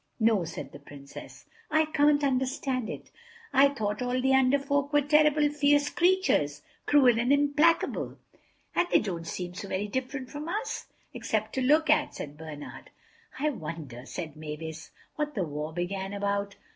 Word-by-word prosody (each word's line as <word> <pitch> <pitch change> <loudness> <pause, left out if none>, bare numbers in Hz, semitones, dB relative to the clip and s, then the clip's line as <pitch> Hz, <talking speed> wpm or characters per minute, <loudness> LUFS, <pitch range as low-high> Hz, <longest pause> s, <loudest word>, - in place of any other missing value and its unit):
"No," 220 -5 +3
said 165 - -7
the - - -11
Princess, 140 -1 -12 0.2
"I 315 0 +3
can't 295 -1 +3
understand 260 -2 0
it. - - -8 0.4
I 280 +1 +6
thought 215 -5 -3
all 250 0 0
the 265 +1 +2
Under 265 +1 +4
Folk 280 0 -1
were 290 -1 +3
terrible 300 0 +4
fierce 290 0 +3
creatures, 350 - +2 0.2
cruel 255 -6 +5
and 245 +3 +1
implacable." 290 +3 +2 0.6
"And 350 - +2
they - - +6
don't 170 -5 -4
seem 180 0 -5
so 195 +2 -7
very 195 +2 -2
different 260 +3 -4
from 300 +3 -6
us—except 235 - -4
to 265 - -1
look 300 +4 +4
at," 300 - +2
said 145 0 -7
Bernard. 150 -2 -9 0.5
"I 300 +3 +1
wonder," 155 - -7
said 160 -4 -6
Mavis, 155 +1 -7 0.3
"what 300 -1 -2
the 195 - 0
war 150 0 -4
began 190 +3 -3
about?" 200 0 -2
255 Hz, 160 wpm, -28 LUFS, 175-290 Hz, 0.6 s, I